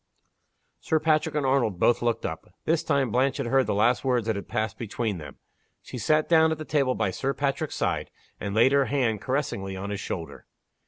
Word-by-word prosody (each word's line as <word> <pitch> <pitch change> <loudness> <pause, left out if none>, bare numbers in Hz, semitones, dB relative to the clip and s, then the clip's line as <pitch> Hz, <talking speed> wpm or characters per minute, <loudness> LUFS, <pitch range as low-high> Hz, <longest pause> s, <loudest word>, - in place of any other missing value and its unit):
Sir 160 - +1
Patrick 155 0 +1
and 145 -2 0
Arnold 125 -9 +1
both 120 - +3
looked 120 -1 0
up. - - -6
This 160 0 +1
time 140 -5 +1
Blanche 130 +3 +2
had 140 - -2
heard 135 +2 +2
the - - 0
last 115 +4 +2
words 125 -4 +1
that 110 -1 0
had 100 - -6
passed 110 -1 -2
between 110 -3 -3
them. 75 - -10 0.5
She 125 - -7
sat 155 +6 +2
down 160 -1 +5
at 160 - -1
the 155 - -7
table 140 -4 +1
by 95 - 0
Sir 135 +8 -2
Patrick's 140 +2 -2
side, - - -1 0.3
and 100 0 -4
laid 115 +4 +5
her 140 -1 +4
hand 120 -8 0
caressingly 100 -8 -2
on 100 +2 -5
his 100 - -3
shoulder. 85 -4 -6
130 Hz, 210 wpm, -26 LUFS, 110-145 Hz, 0.5 s, down